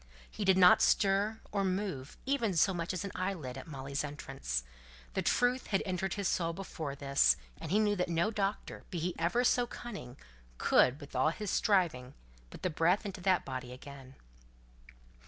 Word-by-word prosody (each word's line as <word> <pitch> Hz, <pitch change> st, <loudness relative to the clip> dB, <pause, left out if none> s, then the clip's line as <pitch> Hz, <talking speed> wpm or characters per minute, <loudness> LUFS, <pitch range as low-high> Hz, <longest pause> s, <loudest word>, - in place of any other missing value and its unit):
He 215 Hz, -, -4 dB
did 190 Hz, -1 st, +5 dB
not 180 Hz, -1 st, +7 dB
stir 205 Hz, +2 st, +2 dB
or 200 Hz, -1 st, 0 dB
move, 185 Hz, -8 st, -3 dB
even 250 Hz, -8 st, 0 dB
so 190 Hz, +4 st, +4 dB
much 170 Hz, -1 st, -2 dB
as 185 Hz, 0 st, -3 dB
an 200 Hz, -, -5 dB
eyelid, 180 Hz, -9 st, -3 dB
at 135 Hz, -, -8 dB
Molly's 140 Hz, -1 st, -4 dB
entrance. 135 Hz, -, -4 dB, 0.5 s
The -, -, 0 dB
truth 245 Hz, +1 st, +1 dB
had 195 Hz, -, +1 dB
entered 185 Hz, 0 st, -2 dB
his 200 Hz, -2 st, -1 dB
soul 170 Hz, -1 st, 0 dB
before 165 Hz, -6 st, -5 dB
this, 140 Hz, -, +3 dB, 0.2 s
and -, -, -6 dB
he 200 Hz, -, +3 dB
knew 210 Hz, -1 st, +3 dB
that 180 Hz, -2 st, -1 dB
no 170 Hz, +5 st, +1 dB
doctor, 205 Hz, -1 st, -3 dB
be 180 Hz, -, -4 dB
he 170 Hz, +2 st, -2 dB
ever 180 Hz, +9 st, +2 dB
so 245 Hz, 0 st, +3 dB
cunning, 200 Hz, -, -8 dB, 0.4 s
could, 130 Hz, +3 st, +4 dB
with 145 Hz, -3 st, -11 dB
all 130 Hz, +4 st, +3 dB
his 205 Hz, +4 st, -4 dB
striving, 160 Hz, -11 st, +1 dB, 0.3 s
put -, -, -12 dB
the 185 Hz, -, 0 dB
breath 175 Hz, +7 st, +2 dB
into 190 Hz, -2 st, -6 dB
that 185 Hz, -1 st, +2 dB
body 130 Hz, -2 st, -5 dB
again. 135 Hz, 0 st, -11 dB
180 Hz, 180 wpm, -32 LUFS, 140-200 Hz, 0.5 s, not